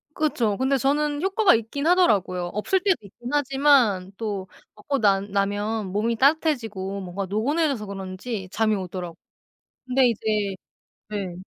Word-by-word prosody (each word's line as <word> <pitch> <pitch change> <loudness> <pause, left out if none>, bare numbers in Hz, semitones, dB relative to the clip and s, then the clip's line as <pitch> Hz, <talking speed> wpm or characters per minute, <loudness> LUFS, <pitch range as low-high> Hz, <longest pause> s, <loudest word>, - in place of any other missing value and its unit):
그쵸. 235 -9 0
근데 265 +1 +2
저는 290 +2 0
효과가 390 - +4
있긴 230 +7 -2
하더라고요. 205 - +3
없을 210 - +1
때도 385 -3 +2
있긴 225 +4 -10
하지만 270 -9 +3
또 205 -4 -4 0.3
먹고 275 +6 -2
난 200 -1 +2
나면 205 +2 -1
몸이 220 +4 0
따뜻해지고 225 - +1
뭔가 190 +1 -4
노곤해져서 255 - 0
그런지 195 +1 -6
잠이 215 -1 +1
오더라고요. 180 -3 -5 0.7
근데 255 0 +3
이제 210 -3 -1 0.5
네. 200 -4 -4
220 Hz, 315 characters per minute, -24 LUFS, 195-275 Hz, 0.7 s, 효과가